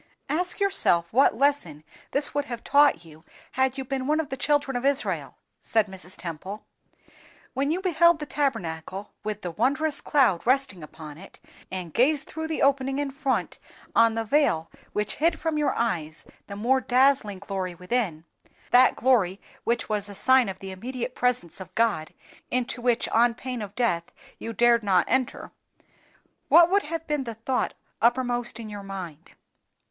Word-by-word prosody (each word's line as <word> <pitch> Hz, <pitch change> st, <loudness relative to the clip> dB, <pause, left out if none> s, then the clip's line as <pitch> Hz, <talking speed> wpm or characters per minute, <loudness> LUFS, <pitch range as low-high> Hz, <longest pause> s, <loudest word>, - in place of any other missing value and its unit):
"Ask 355 Hz, +7 st, -1 dB
yourself 175 Hz, -, +2 dB
what 255 Hz, -2 st, +4 dB
lesson 255 Hz, -, +1 dB, 0.3 s
this 285 Hz, +1 st, +1 dB
would 290 Hz, 0 st, -1 dB
have 240 Hz, -4 st, -6 dB
taught 280 Hz, -, +4 dB
you 160 Hz, 0 st, -15 dB, 0.3 s
had 260 Hz, 0 st, 0 dB
you 265 Hz, -, -4 dB
been 265 Hz, 0 st, -3 dB
one 305 Hz, +1 st, +2 dB
of 315 Hz, -, -2 dB
the 265 Hz, -, -3 dB
children 285 Hz, -1 st, 0 dB
of 245 Hz, -, -2 dB
Israel," 280 Hz, 0 st, -1 dB, 0.2 s
said 220 Hz, -2 st, +2 dB
Mrs. 185 Hz, -2 st, -7 dB
Temple. 185 Hz, +5 st, -7 dB, 0.9 s
"When 275 Hz, +2 st, 0 dB
you 345 Hz, +4 st, 0 dB
beheld 340 Hz, -2 st, +4 dB
the 300 Hz, -, -5 dB
Tabernacle 195 Hz, -, -3 dB
with 210 Hz, -1 st, -4 dB
the 175 Hz, -, -3 dB
wondrous 280 Hz, -, 0 dB
cloud 250 Hz, -, +3 dB
resting 260 Hz, -7 st, +1 dB
upon 155 Hz, 0 st, -10 dB
it, 195 Hz, -, -13 dB, 0.3 s
and 180 Hz, -4 st, -5 dB
gazed 290 Hz, +4 st, +3 dB
through 320 Hz, 0 st, -5 dB
the 320 Hz, -, -1 dB
opening 270 Hz, -1 st, +2 dB
in 285 Hz, -1 st, -2 dB
front 275 Hz, -1 st, -2 dB, 0.4 s
on 230 Hz, -1 st, +5 dB
the 225 Hz, -, -1 dB
veil 220 Hz, -, +1 dB, 0.2 s
which 210 Hz, 0 st, -1 dB
hid 330 Hz, +3 st, +1 dB
from 320 Hz, -2 st, -1 dB
your 295 Hz, -, +1 dB
eyes 165 Hz, -9 st, -2 dB, 0.2 s
the 200 Hz, -, -7 dB
more 250 Hz, +6 st, +2 dB
dazzling 255 Hz, -5 st, +3 dB
glory 190 Hz, -2 st, -4 dB
within—that 185 Hz, +5 st, 0 dB
glory 205 Hz, -7 st, +2 dB, 0.3 s
which 235 Hz, 0 st, 0 dB
was 210 Hz, -1 st, -2 dB
a 200 Hz, -, -9 dB
sign 260 Hz, 0 st, +4 dB
of 190 Hz, -, -6 dB
the 190 Hz, 0 st, -8 dB
immediate 245 Hz, +5 st, -5 dB
presence 250 Hz, -11 st, -1 dB
of 190 Hz, -, -11 dB
God, 215 Hz, -9 st, +1 dB, 0.4 s
into 250 Hz, 0 st, -2 dB
which 240 Hz, -1 st, +1 dB
on 235 Hz, +1 st, +3 dB
pain 250 Hz, -1 st, -5 dB
of 205 Hz, -1 st, -7 dB
death 175 Hz, -9 st, 0 dB, 0.3 s
you 230 Hz, -, -5 dB
dared 235 Hz, +1 st, +4 dB
not 190 Hz, -4 st, +3 dB
enter—what 330 Hz, +6 st, -1 dB
would 400 Hz, +1 st, +4 dB
have 325 Hz, -1 st, -4 dB
been 300 Hz, -3 st, -1 dB
the 230 Hz, -1 st, -5 dB
thought 250 Hz, +4 st, -2 dB, 0.3 s
uppermost 240 Hz, 0 st, +1 dB
in 225 Hz, -, -7 dB
your 205 Hz, -1 st, -7 dB
mind?" 180 Hz, -5 st, -8 dB
240 Hz, 165 wpm, -26 LUFS, 195-275 Hz, 0.9 s, on